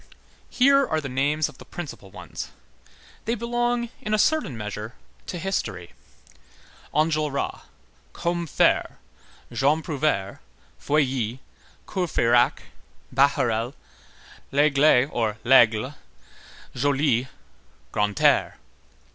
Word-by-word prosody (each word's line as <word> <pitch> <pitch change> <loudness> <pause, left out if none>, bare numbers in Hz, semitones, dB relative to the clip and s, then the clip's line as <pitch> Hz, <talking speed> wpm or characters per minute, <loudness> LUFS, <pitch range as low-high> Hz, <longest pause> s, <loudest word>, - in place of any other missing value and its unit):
Here 275 +2 +4
are 160 - 0
the 145 - -5
names 145 +4 +1
of - - -14
the - - -10
principal 145 - -8
ones. - - -8 0.8
They 230 - 0
belong, 240 +1 -1
in 215 0 0
a - - +1
certain 255 - +1
measure, 105 +1 -6 0.3
to 180 - -4
history: 110 - -3 1.0
Enjolras, 155 -2 0 0.5
Combeferre, 170 -2 0 0.5
Jean 150 +4 +1
Prouvaire, 145 - -1 0.4
Feuilly, 130 -5 0 0.5
Courfeyrac, 120 - +2 0.5
Bahorel, 125 -3 +2 0.8
Lesgle 140 -2 +4
or 110 -3 -1
Laigle, 120 0 +5 0.8
Joly, 135 -2 +1 0.7
Grantaire. 105 0 +2
140 Hz, 90 wpm, -24 LUFS, 120-170 Hz, 1.0 s, Laigle